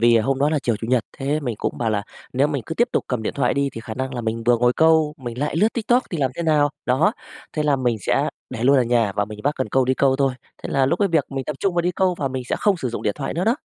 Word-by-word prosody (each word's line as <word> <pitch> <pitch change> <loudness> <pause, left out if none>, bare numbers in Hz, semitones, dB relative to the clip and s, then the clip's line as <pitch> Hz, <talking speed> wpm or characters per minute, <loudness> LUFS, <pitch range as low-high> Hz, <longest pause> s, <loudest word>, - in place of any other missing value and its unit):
vì, 120 0 +5
à, 110 - +3
hôm 135 +2 0
đó 145 +2 +3
là 155 - +1
chiều 115 -3 +1
Chủ 115 +2 -6
nhật, 125 -4 +2
thế 140 +3 -1
mình 120 -7 -3
cũng - - -3
bảo 115 -2 0
là 105 -2 0 0.3
nếu 135 +3 +3
mình 140 -5 -2
cứ 160 - -4
tiếp 240 +2 +2
tục - - 0
cầm 125 -4 -2
điện - - -3
thoại 140 - +1
đi 140 0 +1
thì 115 - -7
khả 110 -1 -7
năng 130 +1 -4
là 120 - -2
mình 115 0 -2
vừa 120 0 +4
ngồi 120 +1 +3
câu 160 -1 +3
mình 120 -3 -7
lại 150 +2 -1
lướt 215 +6 +4
TikTok 240 +2 +2
thì 170 - -3
làm 130 -3 +1
thế 170 - -2
nào? 150 -2 +3 0.2
Đó. 150 - +3 0.4
Thế 155 - -1
là 145 -2 +2
mình 125 -3 0
sẽ - - +1 0.2
để 115 - -5
luôn 140 +2 +5
ở 130 - +4
nhà 115 -4 +1
và 105 - +2
mình 105 0 -9
vác 145 +2 +1
cần 130 - -2
câu 130 -1 +2
đi 130 - +1
câu 135 0 +2
thôi, 135 -2 +1 0.3
thế - - -5
là 135 -1 +3
lúc 170 +6 +1
ấy 200 - +2
việc 160 -5 +2
mình 135 -1 -3
tập 150 - -4
trung 195 -3 0
vào 175 - +2
đi 175 - +1
câu 185 0 +1
và 135 - -1
mình 130 -1 -4
sẽ - - 0
không 205 -2 +2
sử 135 -7 -3
dụng 120 - -5
điện 105 - 0
thoại 135 - -4
nữa 175 - -1
đó. 230 +5 +2
135 Hz, 335 wpm, -22 LUFS, 120-155 Hz, 0.4 s, vì